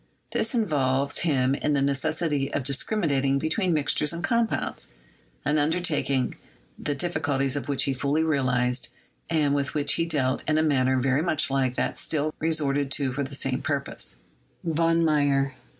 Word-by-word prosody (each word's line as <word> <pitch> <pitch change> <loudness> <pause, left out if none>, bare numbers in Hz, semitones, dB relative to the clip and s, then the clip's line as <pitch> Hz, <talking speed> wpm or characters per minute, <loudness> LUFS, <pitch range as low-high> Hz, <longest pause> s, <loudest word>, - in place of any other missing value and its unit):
This 225 +3 0
involves 140 - +1
him 135 -5 +2
in 150 +1 0
the 140 - +2
necessity 140 +1 0
of 145 - -1
discriminating 140 - +1
between 170 +6 0
mixtures 150 -1 +2
and 170 0 -5
compounds, 235 -2 -1 0.5
an 150 - +2
undertaking 150 -5 0 0.4
the 145 - -2
difficulties 145 -5 -1
of 140 -4 -4
which 140 -2 +2
he 135 - 0
fully 140 +4 0
realized, 125 -5 +1 0.4
and 150 -4 +2
with 140 0 -1
which 145 -1 +2
he 165 0 0
dealt 135 -5 0
in 155 0 +2
a 155 - +3
manner 130 -4 +2
very 130 +2 +2
much 155 -4 +1
like 130 -2 +1
that - - -1
still 155 0 0
resorted 145 -3 +1
to 135 -3 -1
for 140 - -2
the 140 0 -3
same 135 -1 -1
purpose, 140 - -3 0.5
(von 165 0 +2
Meyer.) 140 -3 +2
145 Hz, 160 wpm, -26 LUFS, 135-160 Hz, 0.5 s, a